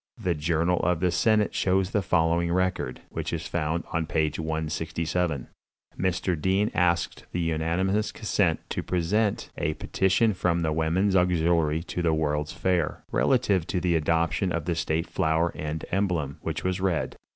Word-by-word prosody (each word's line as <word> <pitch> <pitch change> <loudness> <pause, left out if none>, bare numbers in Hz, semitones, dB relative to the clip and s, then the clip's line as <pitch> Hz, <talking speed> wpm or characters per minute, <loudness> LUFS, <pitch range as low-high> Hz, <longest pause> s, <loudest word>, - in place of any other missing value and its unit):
The 95 -6 0
journal 85 +3 +1
of 90 -1 +1
the 90 0 +2
senate 105 +2 +2
shows 95 +1 +1
the 105 - +1
following 85 -1 +1
record, 90 -8 -1
which - - -4
is - - -3
found 80 +2 -1
on 80 -1 0
page 80 -1 0
167: 80 -1 -2 0.5
"Mr. 90 -3 -1
Dean 95 +4 +2
asked 85 -1 +1
the 90 - -2
unanimous 85 +6 0
consent 100 -7 0
to - - -1
present 100 +5 0
a 75 - 0
petition 95 +4 +2
from 85 -2 0
the 80 -1 +1
Women's 85 +5 +1
Auxiliary 85 -3 +2
to 90 - -4
the 80 -2 +2
World's 75 -1 -1
Fair, 90 -4 0
relative 95 -5 +2
to 90 - -1
the 90 -1 +1
adoption 85 +3 +1
of 85 -3 -2
a 85 - +1
state 80 0 -1
flower 80 +2 +1
and 75 0 -4
emblem, 85 -8 -1
which 80 0 -3
was 95 0 -1
read. 95 -4 0
85 Hz, 160 wpm, -26 LUFS, 80-95 Hz, 0.5 s, the